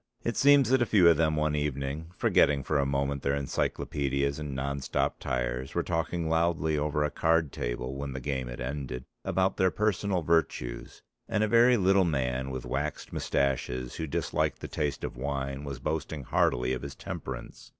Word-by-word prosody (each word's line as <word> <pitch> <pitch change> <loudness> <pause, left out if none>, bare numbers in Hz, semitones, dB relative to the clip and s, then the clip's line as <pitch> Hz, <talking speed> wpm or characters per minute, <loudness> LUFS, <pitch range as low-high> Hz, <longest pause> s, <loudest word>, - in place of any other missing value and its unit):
It 115 - -1
seems 140 -3 +5
that 130 -1 +4
a 120 - +2
few 95 -6 +5
of 85 - +5
them 80 -1 +2
one 75 0 +1
evening, 75 +2 -2
forgetting 70 -2 +3
for 75 +2 +1
a 70 - +1
moment 70 0 -1
their 70 +1 +1
encyclopedias 70 0 -1
and 75 -3 -5
non 70 +1 -2
stop - - -1
tyres, 60 +1 -2
were - - +1
talking 80 0 -1
loudly 80 -1 +1
over 75 0 0
a 75 - 0
card 80 -2 +2
table - - -3
when 70 0 -4
the 65 - -4
game 65 -1 -3
had - - -7
ended 65 -1 -4 0.2
about 95 +2 +1
their 95 - +4
personal 100 -2 0
virtues, 80 -7 -1 0.3
and 110 -1 +1
a - - +2
very 120 +2 +5
little 95 -1 +4
man 65 -5 -1
with 65 -1 -5
waxed 75 +2 -3
moustaches 65 -2 -1
who 80 - -3
disliked 70 - -1
the - - -5
taste 75 -2 -2
of - - -4
wine 70 +1 -3
was 70 -2 -5
boasting 75 +2 -3
heartily 60 +1 +1
of 65 - -3
his 70 -1 -7
temperance. - - -7
70 Hz, 185 wpm, -29 LUFS, 65-80 Hz, 0.3 s, seems